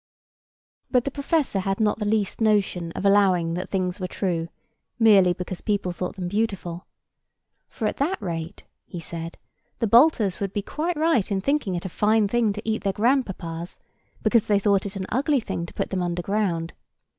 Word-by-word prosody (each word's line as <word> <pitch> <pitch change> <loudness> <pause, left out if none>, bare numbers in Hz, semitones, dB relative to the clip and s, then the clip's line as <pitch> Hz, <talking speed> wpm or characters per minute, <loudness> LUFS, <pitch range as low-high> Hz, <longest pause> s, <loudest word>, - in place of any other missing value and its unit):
But 250 -2 +3
the 275 - -3
professor 280 -5 0
had 195 +1 -1
not 215 0 +1
the 210 - -2
least 210 0 0
notion 200 -6 +1
of - - -4
allowing 190 -4 +4
that 180 +2 -4
things 185 0 -1
were 185 - -2
true, 175 -4 -2 0.5
merely 205 -6 +6
because 180 0 -5
people 205 -4 -1
thought 180 +2 -4
them 180 -3 -4
beautiful. 190 -4 -2 0.8
For 225 - -4
at - - -3
that 325 +8 0
rate, 170 -4 -5 0.2
he 175 - -7
said, 165 0 -6 0.4
the - - 0
Baltas 230 - +4
would 195 -1 -3
be 205 - -2
quite 320 - -2
right 305 - +2
in 195 - +1
thinking 245 -4 0
it 175 - -4
a - - -3
fine 215 +3 +2
thing 230 0 +2
to 210 +2 -8
eat 220 0 -1
their 195 -1 0
grandpapas, 190 -9 -1 0.4
because 230 -3 +3
they 205 - +4
thought 200 -1 +2
it 195 - -8
an 190 -1 -3
ugly 275 +4 +2
thing 170 -7 -4
to - - -12
put - - -2
them 190 -2 -1
underground. 175 -1 -1
200 Hz, 185 wpm, -24 LUFS, 180-225 Hz, 0.8 s, merely